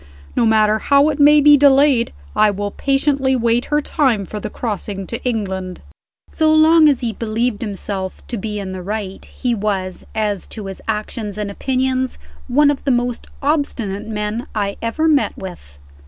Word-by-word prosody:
No 235 - +3
matter 215 -1 +3
how 280 +4 +4
it 300 -1 -3
may 295 +1 +7
be 295 0 +7
delayed, 275 -3 +4 0.2
I 215 - +5
will 205 0 -3
patiently 270 0 +1
wait 235 0 +1
her 295 0 +1
time 245 -11 +1
for 210 - -6
the - - -5
crossing 205 -3 -4
to 230 +6 -6
England." 190 -6 -3 0.5
So 315 -1 +2
long 315 0 +6
as 275 -3 +1
he 235 -3 -2
believed 225 +1 -2
himself 195 -3 -4
to 245 - -5
be 210 +1 -4
in 195 -2 -5
the 185 -1 -6
right, 200 0 -5
he 245 -2 -3
was, 195 -4 -3
as 210 -3 -1
to 215 -3 -7
his 195 -1 -7
actions 210 -1 -4
and 210 -1 -3
opinions, 260 +2 -1 0.3
one 285 +3 +4
of 280 - -5
the - - -1
most 245 -1 -1 0.2
obstinate 235 -9 -1
men 210 +2 -3
I 200 -2 -1
ever 230 +8 0
met 295 -3 +2
with. 170 - -10
230 Hz, 175 wpm, -19 LUFS, 205-270 Hz, 0.5 s, may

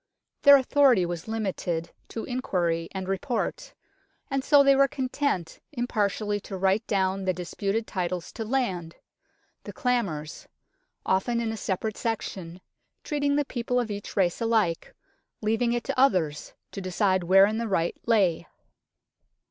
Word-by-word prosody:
Their 285 0 +9
authority 260 -7 +4
was 170 +1 -5
limited 190 -6 -3 0.2
to 225 - -6
inquiry 175 -10 -1
and 190 -1 -5
report; 210 +6 -3 0.6
and 270 -1 0
so 285 0 +6
they 275 0 +5
were 275 0 +5
content 255 - -2
impartially 210 -4 -1
to 195 -1 -7
write 195 +4 +1
down 190 -1 0
the 185 - +1
dis 180 -1 -7
puted 210 +3 -1
titles 180 -3 -3
to 225 - -5
land 195 -9 -2 0.7
the - - -7
clamores 190 - -2 0.6
often 235 +6 +1
in 230 -1 -1
a - - -4
separate 210 +2 -3
section, 190 -6 -4 0.4
treating 285 -1 0
the 290 0 +1
people 245 -1 -1
of 230 -3 -2
each 205 0 -7
race 180 0 +1
alike, 220 -7 0 0.4
leaving 225 +2 +1
it 240 0 -1
to 275 -2 -3
others 180 - +1 0.2
to 195 - -6
decide 185 0 +1
wherein 195 +4 +5
the 230 - -2
right 170 -5 0
lay. 200 -8 +2
205 Hz, 145 wpm, -26 LUFS, 185-245 Hz, 0.7 s, Their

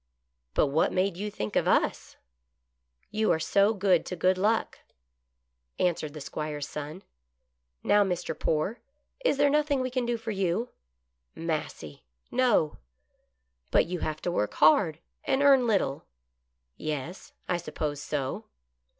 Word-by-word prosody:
" 60 0 -52
But - - +4
what 150 +4 +2
made 185 0 +1
you 205 +4 -4
think 105 - -5
of - - +2
us - - +1 0.3
} 60 - -52
" 60 0 -52
" 60 0 -43
You 215 0 +2
are 160 - +2
so 200 +5 +3
good 185 -4 +3
to 180 - -4
Good 185 +2 +3
Luck," 210 +4 0 1.0
answered 160 -4 0
the - - -6
66 140 - -8
GOOD - - -7
LUCK. - - 0 0.2
'Squire's - - -4
son. 150 +5 -7 0.4
" 60 0 -51
Now, 205 0 +5
Mr. 180 -3 -2
Poore, 160 +9 0 0.4
is - - +2
there 285 0 +4
nothing 295 -2 +2
we 255 0 -2
can 250 -1 -1
do 240 -1 0
for 225 0 -5
you? 195 +4 -1 0.2
" 60 +1 -51
" 60 +1 -52
Massy 150 - -4
— 60 - -45
no." 210 -12 +2 0.5
" - - -48
But - - +4
you 180 +1 -4
have 155 0 -4
to 175 - 0
work 105 -10 -1
hard, 155 +1 +5 0.3
and 270 +1 +2
earn 270 -3 +6
little." 190 -11 0 0.7
"Yes 155 +3 -5
— - - -40
I 180 - +1
suppose 150 -3 -4
so." 140 -3 -3
165 Hz, 180 wpm, -28 LUFS, 135-205 Hz, 1.0 s, earn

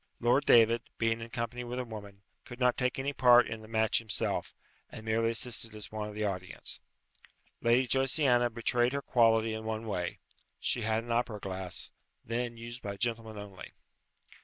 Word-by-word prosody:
Lord 125 +5 +2
David, 115 0 +6 0.2
being 115 0 0
in 115 - -7
company 120 +1 -4
with 120 +1 -5
a 125 - -2
woman, 100 -3 -10 0.2
could 120 - -11
not 125 -1 +3
take 125 -1 0
any 135 +2 -2
part 125 -2 +6
in 110 0 -6
the 110 - -12
match 110 -1 +2
himself, 110 -2 -2 0.3
and 110 - -10
merely 115 +1 +2
assisted 115 -1 0
as 105 - -5
one 105 -1 -4
of 105 - -10
the 105 0 -1
audience. 90 -3 -4 0.8
Lady 120 +3 +4
Josiana 130 -1 +3
betrayed 120 +2 +1
her 140 0 -2
quality 115 -2 +3
in 110 0 -5
one 110 0 -3
way; 90 -5 -3 0.4
she - - 0
had 110 +1 0
an 120 - -6
opera 115 -2 0
glass, 95 -2 -2 0.3
then 120 +1 -3
used 120 +2 -8
by 100 -1 -5
gentlemen 115 -1 -3
only. 100 -3 -9
115 Hz, 180 wpm, -31 LUFS, 110-120 Hz, 0.8 s, David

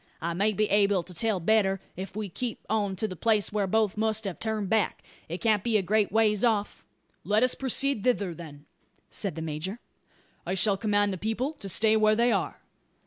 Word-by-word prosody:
I 170 +1 -2
may 200 +5 +2
be 215 +1 0
able 200 -2 +3
to 180 - -12
tell 215 +2 0
better, 195 +1 +2 0.2
if 190 +1 -7
we 215 -1 -3
keep 230 +5 -5
on 205 -3 0
to 215 +4 -2
the 185 - -7
place 215 +2 +1
whar 205 -2 0
both 215 0 +1
must 220 0 0
have 195 -4 -5
turned 220 -2 -2
back. 215 0 0 0.3
It 170 +3 -5
can't 215 -3 +2
be 230 -2 +2
a 200 - 0
great 210 +2 +1
ways 215 -1 +2
off." 215 -4 0 0.4
"Let 210 +3 +2
us 255 - +4
proceed 270 -3 0
thither, 205 -8 +1
then," 150 -3 -11 0.5
said 195 -7 -2
the 160 - -5
major. 160 +7 -4 0.7
"I 185 - -2
shall 200 +1 +3
command 205 0 +1
the 185 - -6
people 230 - -2
to 200 -10 -8
stay 220 +4 +4
where 215 0 +4
they 235 +2 +3
are." - - -2
210 Hz, 205 wpm, -27 LUFS, 190-220 Hz, 0.7 s, us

